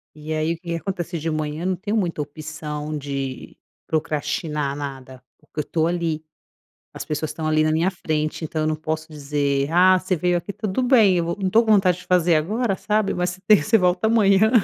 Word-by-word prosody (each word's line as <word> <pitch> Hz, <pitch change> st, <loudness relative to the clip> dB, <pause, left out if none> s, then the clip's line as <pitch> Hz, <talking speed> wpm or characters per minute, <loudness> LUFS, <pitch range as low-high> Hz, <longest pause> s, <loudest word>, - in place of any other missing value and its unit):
E 155 Hz, +1 st, -5 dB
aí 155 Hz, +1 st, 0 dB
o -, -, -5 dB
que -, -, -34 dB
que 170 Hz, -, -1 dB
acontece: 175 Hz, -1 st, -4 dB
de 160 Hz, +2 st, -2 dB
manhã 155 Hz, +1 st, -3 dB
não 185 Hz, 0 st, +1 dB
tenho 205 Hz, +4 st, -2 dB
muita 175 Hz, -7 st, -1 dB
opção 150 Hz, 0 st, -5 dB
de 135 Hz, -2 st, -5 dB, 0.3 s
procrastinar 150 Hz, -2 st, -2 dB
nada, 135 Hz, -3 st, -7 dB, 0.2 s
porque -, -, -10 dB
eu -, -, +3 dB
estou 160 Hz, +2 st, 0 dB
ali, 165 Hz, -3 st, -1 dB, 0.7 s
as -, -, -6 dB
pessoas 155 Hz, 0 st, -2 dB
estão 155 Hz, 0 st, -4 dB
ali 155 Hz, 0 st, +3 dB
na 155 Hz, -, +2 dB
minha 165 Hz, +4 st, +2 dB
frente, 155 Hz, -3 st, -2 dB
então 155 Hz, 0 st, -3 dB
eu 155 Hz, -, +1 dB
não 155 Hz, -, 0 dB
posso 155 Hz, 0 st, -4 dB
dizer: 140 Hz, -1 st, -1 dB
"Ah, 185 Hz, +2 st, +5 dB
você 185 Hz, 0 st, -1 dB
veio 175 Hz, +2 st, +1 dB
aqui, 175 Hz, +4 st, -5 dB
tudo 210 Hz, +3 st, -2 dB
bem, 225 Hz, -8 st, +5 dB
eu 170 Hz, -, 0 dB
vou 170 Hz, -, -2 dB
não 195 Hz, -, 0 dB
estou 225 Hz, +5 st, +4 dB
com 220 Hz, -, +3 dB
vontade 185 Hz, -4 st, +4 dB
de 180 Hz, -, -14 dB
fazer 180 Hz, -2 st, +3 dB
agora, 205 Hz, +7 st, 0 dB
sabe. 210 Hz, +1 st, 0 dB
Mas 180 Hz, 0 st, -1 dB
se 185 Hz, +1 st, -11 dB
tem 210 Hz, -7 st, +7 dB
você 225 Hz, -, +3 dB
volta 180 Hz, +2 st, +2 dB
amanhã, 215 Hz, -2 st, +4 dB
165 Hz, 215 wpm, -22 LUFS, 150-185 Hz, 0.7 s, tem